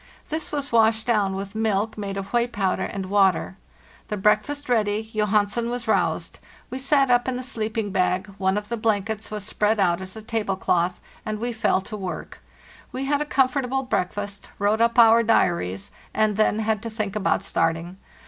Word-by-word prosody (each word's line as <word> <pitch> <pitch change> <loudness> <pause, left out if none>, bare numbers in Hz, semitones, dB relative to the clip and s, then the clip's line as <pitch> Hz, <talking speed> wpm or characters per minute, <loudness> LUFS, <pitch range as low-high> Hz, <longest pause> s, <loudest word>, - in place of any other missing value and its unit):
This 315 +1 -3
was 285 -1 -3
washed 225 -1 +3
down 205 -5 +1
with 195 0 -5
milk, 220 -1 0
made 200 -2 -4
of 195 0 -6
whey 240 0 +3
powder 195 -6 -1
and 195 -1 -4
water. 190 -1 +2 0.5
The 210 - -3
breakfast 285 +9 +1
ready, 215 -3 +1
Johansen 210 +2 +1
was 240 -1 -4
roused; 220 - 0 0.3
we 260 - -4
sat 275 -1 +3
up 245 +1 +3
in 260 - 0
the 255 - -4
sleeping 220 -4 -3
bag, 185 0 +1
one 190 +1 +1
of 210 0 -4
the 235 - -2
blankets 215 0 -1
was 210 -2 -4
spread 210 +1 +1
out 180 -2 +2
as 190 +1 -6
a 220 - -8
table 220 -3 -1
cloth, 180 -1 0 0.2
and 215 -1 -3
we 240 +2 -3
fell 215 -4 +1
to 215 - -8
work. 190 -3 -6 0.5
We 265 +1 -3
had 290 +1 +1
a - - 0
com 270 -3 +3
fortable 265 0 -2
breakfast, 200 0 -3
wrote 210 +3 +1
up 235 +1 +2
our 230 0 +7
diaries, 170 - +1 0.2
and 215 -1 +2
then 215 0 +2
had 220 -1 0
to 230 - -5
think 215 -2 -3
about 195 -2 +1
starting. 165 0 -1
215 Hz, 190 wpm, -24 LUFS, 195-235 Hz, 0.5 s, our